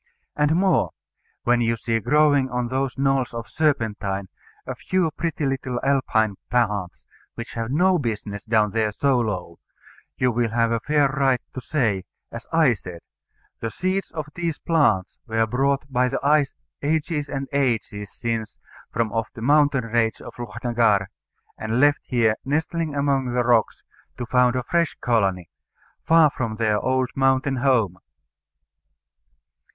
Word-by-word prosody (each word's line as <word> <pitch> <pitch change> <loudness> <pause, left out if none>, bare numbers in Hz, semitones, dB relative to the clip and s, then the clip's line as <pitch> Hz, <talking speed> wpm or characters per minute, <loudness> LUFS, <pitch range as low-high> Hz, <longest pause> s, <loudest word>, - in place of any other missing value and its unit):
And 150 +1 +2
more: 185 0 +2 0.5
When 120 0 +3
you 115 0 +1
see 115 0 -1
growing 145 +2 +3
on 125 -1 -2
those 130 0 -2
knolls 135 -3 +1
of 115 -1 -5
serpentine 105 -10 -1 0.4
a - - -4
few 185 -4 0
pretty 160 -1 -3
little 130 -2 -2
Alpine 110 -7 +1
plants, 105 -7 -1 0.3
which 115 0 -7
have 115 0 -3
no 180 +6 +3
business 105 -5 -4
down 110 -2 +2
there 110 -1 0
so 135 +4 +1
low, 90 -7 -3 0.6
you 125 -1 +2
will 120 0 0
have 115 +1 +1
a 115 - +1
fair 145 +4 +2
right 135 -2 +2
to 130 - -6
say, 115 -9 0 0.3
as 115 0 -8
I 160 -6 +4
said, 90 -5 -9 0.6
"The 115 - -3
seeds 185 +8 -2
of 155 -3 -5
these 170 -3 -2
plants 110 - +1
were 115 0 +1
brought 135 +4 0
by 125 -2 +1
the 130 - -2
ice 145 -1 +3 0.3
ages 150 0 -1
and 135 -1 -3
ages 115 -7 -1
since 115 -2 -4 0.3
from 115 -1 -1
off 115 0 -2
the 115 - -8
mountain 145 -2 +3
range 115 0 0
of - - -10
Lochnagar, 115 -4 +1 0.5
and 110 +2 -1
left 145 +1 +4
here, 115 -4 +1
nestling 155 +2 -1
among 135 -3 0
the 125 0 +2
rocks, 120 -2 +2 0.3
to 125 - -4
found 125 0 +3
a 125 - -1
fresh 170 +3 0
colony, 95 -7 0 0.5
far 160 -2 +5
from 115 -4 -2
their 110 -2 +1
old 130 -1 0
mountain 135 0 +2
home." 115 -9 +1
125 Hz, 150 wpm, -23 LUFS, 115-140 Hz, 0.6 s, far